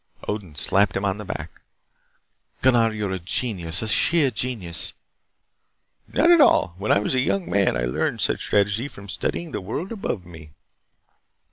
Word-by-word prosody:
Odin 100 Hz, -7 st, -5 dB
slapped 95 Hz, +6 st, +2 dB
him 100 Hz, -, -2 dB
on 100 Hz, 0 st, -1 dB
the 105 Hz, -, -7 dB
back. 80 Hz, -3 st, -7 dB, 1.0 s
"Gunnar, 120 Hz, -3 st, +4 dB
you 105 Hz, -1 st, -3 dB
are -, -, -4 dB
a 95 Hz, -, -3 dB
genius, 90 Hz, -2 st, 0 dB
a -, -, -3 dB
sheer 150 Hz, +4 st, +3 dB
genius." 105 Hz, -8 st, 0 dB, 1.1 s
"Not 335 Hz, +4 st, +3 dB
at 340 Hz, -2 st, +7 dB
all. 90 Hz, -, +4 dB
When 105 Hz, -, -1 dB
I -, -, +5 dB
was 105 Hz, +4 st, -1 dB
a 130 Hz, -, +2 dB
young 175 Hz, +8 st, 0 dB
man 100 Hz, -9 st, +1 dB
I -, -, -2 dB
learned 60 Hz, -, -1 dB
such -, -, 0 dB
strategy 105 Hz, +5 st, +1 dB
from 100 Hz, -7 st, -12 dB
studying 100 Hz, -, -4 dB
the -, -, -4 dB
world 145 Hz, -, -5 dB
above 155 Hz, -, -4 dB
me." 80 Hz, -3 st, -13 dB
105 Hz, 170 wpm, -23 LUFS, 90-125 Hz, 1.1 s, at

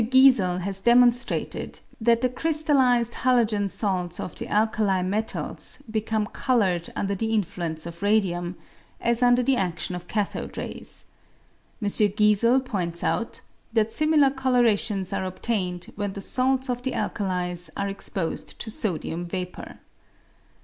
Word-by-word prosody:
Giesel 225 Hz, -8 st, +5 dB
has 195 Hz, +1 st, -3 dB
demonstrated 240 Hz, +2 st, +2 dB, 0.2 s
that 230 Hz, +1 st, +3 dB
the 255 Hz, -, +2 dB
crystallised 260 Hz, -5 st, +2 dB
halogen 225 Hz, -5 st, +2 dB
salts 180 Hz, -4 st, -2 dB
of 180 Hz, -, -5 dB
the -, -, -6 dB
alkali 210 Hz, -3 st, +1 dB
metals 210 Hz, +4 st, -2 dB
become 220 Hz, -1 st, 0 dB
coloured 200 Hz, -7 st, 0 dB
under 200 Hz, 0 st, -1 dB
the 220 Hz, +3 st, -2 dB
in 210 Hz, -, +3 dB
fluence 165 Hz, -2 st, -5 dB
of 170 Hz, +1 st, -8 dB
radium, 185 Hz, -4 st, +1 dB, 0.4 s
as 235 Hz, +1 st, 0 dB
under 245 Hz, 0 st, +4 dB
the 265 Hz, 0 st, +2 dB
adion 180 Hz, -2 st, -2 dB
of 180 Hz, 0 st, -7 dB
cathode 210 Hz, -2 st, -3 dB
rays. -, -, -7 dB, 0.7 s
M. 210 Hz, -, -2 dB
Giesel 210 Hz, +5 st, +3 dB
points 175 Hz, -8 st, -2 dB
out 230 Hz, -, -1 dB, 0.3 s
that 225 Hz, -1 st, +2 dB
similar 305 Hz, -3 st, +4 dB
colourations 235 Hz, -7 st, +1 dB
are -, -, -1 dB
obtained 185 Hz, -1 st, -3 dB
when 205 Hz, -1 st, -3 dB
the 200 Hz, -, -6 dB
salts 260 Hz, +4 st, +1 dB
of 245 Hz, -1 st, -2 dB
the 260 Hz, 0 st, -2 dB
alkalis 180 Hz, -4 st, -2 dB
are 200 Hz, -, -1 dB
exposed 195 Hz, -3 st, -3 dB
to 220 Hz, -, -4 dB
sodium 175 Hz, -4 st, -2 dB
vapour. 180 Hz, 0 st, -6 dB
210 Hz, 135 wpm, -25 LUFS, 185-245 Hz, 0.7 s, Giesel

